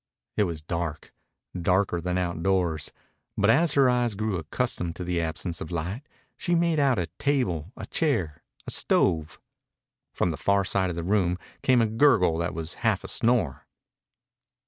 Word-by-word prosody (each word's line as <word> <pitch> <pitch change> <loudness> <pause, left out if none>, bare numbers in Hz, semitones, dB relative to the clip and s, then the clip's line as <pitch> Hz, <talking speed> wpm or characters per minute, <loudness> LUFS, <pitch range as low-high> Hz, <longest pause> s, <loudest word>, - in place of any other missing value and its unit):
It 105 - +3
was 80 -4 -5
dark 85 -1 -4 0.4
darker 90 0 +1
than 90 +1 -1
outdoors. 85 -3 0 0.5
But 105 +2 +4
as 160 +4 +3
her 140 -2 +5
eyes 120 -3 +1
grew 105 -1 -1
accustomed 85 0 -2
to 90 - -5
the 85 -1 -1
absence 85 +1 -3
of 80 - -5
light 90 - -3 0.4
she 175 - 0
made 170 -2 +2
out 135 -4 +3
a 90 - 0
table, 100 - 0
a - - -6
chair, 110 - -1 0.2
a - - -3
stove. 80 0 +1 0.7
From 90 - 0
the 80 - -5
far 100 -1 +2
side 95 0 +1
of 90 - -4
the 85 - -3
room 90 -2 +1 0.2
came 125 -3 +4
a - - +3
gurgle 110 - +3
that 85 -1 -2
was 80 0 -4
half - - +1
a - - -6
snore. 110 - +1
90 Hz, 170 wpm, -26 LUFS, 85-115 Hz, 0.7 s, her